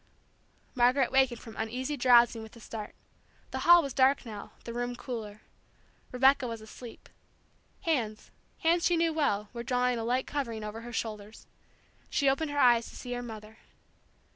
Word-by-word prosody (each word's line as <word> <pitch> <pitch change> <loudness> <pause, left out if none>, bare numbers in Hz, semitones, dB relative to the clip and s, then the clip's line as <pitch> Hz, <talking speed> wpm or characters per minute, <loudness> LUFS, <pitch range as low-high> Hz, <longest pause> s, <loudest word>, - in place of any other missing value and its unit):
Margaret 250 +1 +3
wakened 265 -3 +3
from 225 -2 -11
uneasy 250 +6 -3
drowsing 240 -3 +5
with 220 +1 -11
a - - -13
start. 215 -1 -8 0.6
The - - -3
hall 345 0 +7
was 275 -3 -4
dark 270 +1 +3
now, 210 -3 -9
the 235 - -7
room 245 +1 -3
cooler. 220 -4 -7 0.7
Rebecca 265 +1 +4
was 230 -1 -5
asleep. 220 +2 -12 0.7
Hands, 230 -10 -2 0.3
hands 335 +1 +3
she 350 - +2
knew 330 -1 +2
well, 210 -10 0
were 235 - -5
drawing 250 0 0
a - - -3
light 250 +3 0
covering 235 -7 -4
over 210 +2 -6
her 240 +1 -9
shoulders. 215 -1 -5 0.6
She 280 - +1
opened 275 +3 +1
her 290 - -4
eyes 240 -4 +4
to - - -14
see 250 - -8
her 245 - -3
mother. 220 -2 -10
245 Hz, 165 wpm, -29 LUFS, 225-270 Hz, 0.7 s, hall